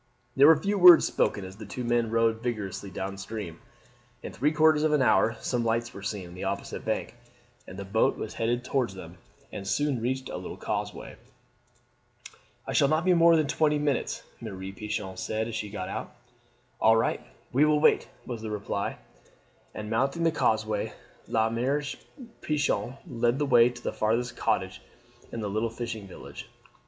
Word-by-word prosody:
There 140 +2 +7
were 160 -1 +8
few 200 +4 -1
words 180 -2 +9
spoken 100 - 0
as 95 +1 -10
the 110 - -8
two 125 - -5
men 120 -1 +1
rowed 115 0 +1
vigorously 105 -5 -4
down 95 +1 -5
stream. 100 -5 -6 0.6
In - - -7
three 150 +3 +1
quarters 155 -1 +4
of 155 0 +2
an 150 - +3
hour 115 -2 +3
some 120 -2 -1
lights 115 +1 -1
were 100 - -9
seen 100 -2 -4
on 85 - -12
the 90 - -7
opposite - - -4
bank, - - -2 0.5
and 95 - -9
the 100 - -6
boat 105 +3 +2
was 110 - -5
headed 120 +2 -1
towards 125 -8 -1
them 90 -1 -10 0.3
and 95 - -6
soon 135 +4 0
reached 130 +2 -2
a - - -5
little - - -7
causeway. - - -4 1.5
"I - - -4
shall 140 - +4
not 155 +4 +1
be 185 - +5
more 170 -1 +6
than 155 -2 +3
twenty 150 +2 +2
minutes," 145 -2 -1 0.2
Mere 110 -5 -6 0.2
Pichon 105 -2 -5
said 110 +3 -2
as 115 - -6
she 105 -1 -3
got 95 -2 -5
out. - - -5 0.7
"All 110 +1 +5
right, 115 - 0 0.3
we 135 +4 +4
will 150 0 +4
wait!" - - +4 0.2
was 120 -3 -5
the 110 - -5
reply, 100 -1 -3 0.8
and 105 - -5
mounting 135 +8 0
the 165 - +4
causeway 110 -7 0 0.3
La 110 -1 +2
Mere 130 +6 0 0.6
Pichon 140 -5 -1
led 120 -2 +1
the 145 - 0
way 120 -3 +6
to 120 0 -11
the - - -2
farthest 115 +2 0
cottage 95 -4 -1 0.5
in 115 - -4
the 105 - -2
little 110 +3 -1
fishing 115 -3 -6
village. 95 - -10
115 Hz, 185 wpm, -28 LUFS, 105-140 Hz, 1.5 s, words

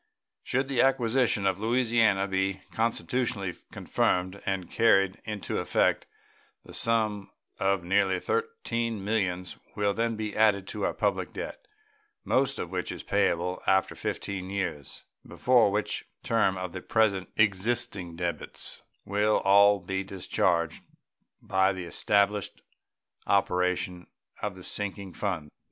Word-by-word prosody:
Should 130 +2 -1
the 135 -3 +2
acquisition 125 -5 +2
of 95 -1 +1
Louisiana 110 -3 +2
be 95 0 -1
constitutionally 115 -2 -1 0.2
confirmed 95 +2 0
and 95 -3 -1
carried 95 -4 +3
into 105 -2 -3
effect, - - +1 0.6
a - - -12
sum 110 -3 +1 0.3
of 95 -2 +1
nearly 95 +1 +2
$13 455 - -2
millions 95 -3 -2 0.2
will 100 -1 +1
then 115 +2 0
be 105 -1 -4
added 105 -3 +3
to - - -2
our - - -1
public - - -1
debt, - - -7 0.6
most 135 +1 +1
of 85 - -5
which 90 -1 -3
is - - -7
payable 90 +2 0
after 95 0 +3
fifteen 95 -2 -4
years, 95 -8 -4 0.2
before 125 -4 +3
which 105 +1 -1 0.2
term 105 -5 +2
the 90 - -6
present 100 -4 +1
existing 100 -3 0
debts 85 0 -4 0.2
will 105 +2 +2
all 100 +1 +6
be 95 +2 -3
discharged 90 -3 0 0.6
by 95 0 +2
the 95 -2 -5
established 100 +3 +1 0.7
operation 90 -2 +1 0.3
of 105 -3 -3
the 90 - -11
sinking 100 -2 -3
fund. 85 -8 -3
100 Hz, 125 wpm, -28 LUFS, 95-110 Hz, 0.7 s, all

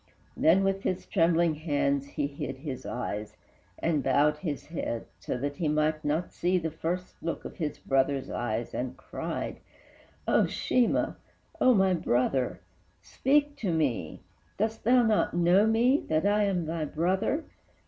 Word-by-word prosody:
Then 180 +5 +4
with 195 0 0
his 185 -2 -2
trembling 170 -2 +3
hands 140 -3 0
he 140 - -2
hid 140 -2 -5
his 135 -2 -6
eyes, 105 -3 -4 0.4
And 160 -3 0
bowed 145 +3 +3
his 150 -3 -4
head, 115 -8 -4
so - - -3
that 145 +2 -3
he 165 - -1
might 155 +1 +1
not 155 +4 -1
see 180 +2 +1
The 165 -2 -2
first 175 +3 -4
look 165 - -4
of - - -8
his 150 -4 -3
brother's 135 0 +1
eyes, 115 -1 -3
and 130 +1 -3
cried, - - -5 0.7
"O, - - +4
Sheemah! 250 -2 +1 0.4
O, 255 -2 +5
my 190 -2 +4
brother, 130 -5 0 0.4
speak 290 +1 +1
to 195 -6 -1
me! 130 - -1 0.4
Dost 220 +2 -1
thou 245 +1 +5
not 220 -6 +2
know 175 +5 +4
me, 240 +6 +3
that 155 +2 +1
I 205 +1 +3
am 185 -4 0
thy 160 0 -2
brother? 190 - 0
160 Hz, 155 wpm, -28 LUFS, 140-190 Hz, 0.7 s, O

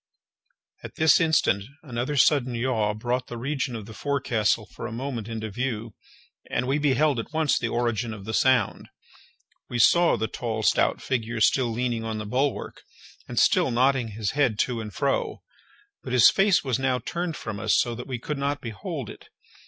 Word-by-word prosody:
At - - -9
this 160 0 +5
instant 155 -11 +2 0.2
another 130 +1 -3
sudden 130 -3 +3
yaw 115 -4 0
brought 120 +3 -2
the 120 - -7
region 135 0 -2
of 110 -3 -6
the 110 - -10
forecastle 120 -4 0
for - - -8
a - - -7
moment 120 -2 -4
into 110 -2 -5
view, 115 -2 -3 0.6
and 125 - -1
we 140 +3 +1
beheld 145 -2 +2
at 115 - -6
once 155 -2 +1
the 120 - -1
origin 120 -1 -1
of 105 -3 -8
the 110 - -4
sound. 130 0 +2 0.8
We 120 - -3
saw 170 +9 +5
the 110 - -1
tall 110 -2 -4
stout - - +2
figure 115 -2 -2
still 125 +3 +3
leaning 120 0 -2
on 110 -1 -3
the 110 - -5
bulwark, 130 +6 -2 0.5
and - - -8
still - - +4
nodding 130 0 +2
his 105 -1 -3
head 135 -7 +1
to 120 -3 -2
and 105 -1 -7
fro, - - -1 0.6
but 125 - -6
his 125 - +7
face 195 -1 +3
was 130 -4 -1
now 130 -1 +1
turned 170 +7 -4
from 110 -3 -6
us 110 0 +2
so 120 - 0
that 120 +2 -7
we 130 -2 -3
could 145 +4 -5
not 140 +1 -1
behold 110 -5 -6
it. - - -12
120 Hz, 185 wpm, -25 LUFS, 110-135 Hz, 0.8 s, his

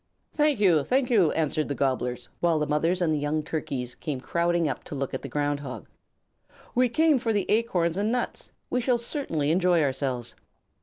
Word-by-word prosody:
"Thank 300 -5 +2
you, 175 -7 +5
thank 255 - +1
you!" 195 -9 +5
answered 155 -1 0
the 140 - -3
Gobblers, 125 -3 -1
while 170 -2 +2
the 150 - 0
mothers 165 +5 +1
and 155 -3 +1
young 150 +1 -1
Turkeys 135 -6 -4
came 150 -5 -4
crowding 170 +3 0
up 135 - -3
to - - -7
look 135 -1 -3
at - - -3
the 140 - -7
Ground 145 +1 -1
Hog. 135 -3 -7 0.9
"We 250 0 +3
came 310 +1 +3
for 230 -2 -1
the 205 -3 +1
acorns 185 -7 +1
and 210 +2 +1
nuts. 245 0 -3 0.2
We 250 - +1
shall 245 0 +2
certainly 230 - -2
enjoy 175 -1 +3
ourselves." 130 -3 -2
165 Hz, 190 wpm, -26 LUFS, 145-220 Hz, 0.9 s, you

